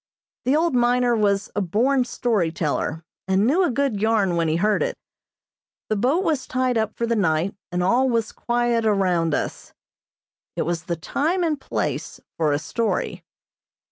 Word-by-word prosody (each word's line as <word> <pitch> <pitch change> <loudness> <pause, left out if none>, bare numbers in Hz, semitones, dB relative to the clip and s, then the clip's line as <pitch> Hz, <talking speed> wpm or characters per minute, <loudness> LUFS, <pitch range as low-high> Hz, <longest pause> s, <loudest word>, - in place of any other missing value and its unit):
The 260 +3 +3
old 330 0 +2
miner 245 0 +3
was 200 -2 +1
a 205 - +1
born 245 +8 +2
story 230 -8 0
teller, 160 0 -2 0.2
and 190 +2 +2
knew 305 +10 +3
a 355 - +2
good 255 -5 0
yarn 210 -5 +2
when 165 -1 +1
he 155 - +1
heard 210 +4 +2
it. - - -1 0.9
The 215 - +1
boat 265 - +1
was 305 -7 -1
tied 255 -1 0
up 220 -1 -1
for 235 - 0
the 230 0 0
night, 180 -2 +1 0.2
and 180 0 0
all 250 +8 +3
was 230 -2 0
quiet 240 -1 0
around 180 -7 +2
us. - - -4 0.8
It - - 0
was 170 -1 -3
the 175 -3 -2
time 315 - -1
and 305 -4 -1
place - - -3 0.2
for 155 -2 +1
a 145 - +2
story. 220 +8 -2
220 Hz, 175 wpm, -23 LUFS, 180-250 Hz, 0.9 s, The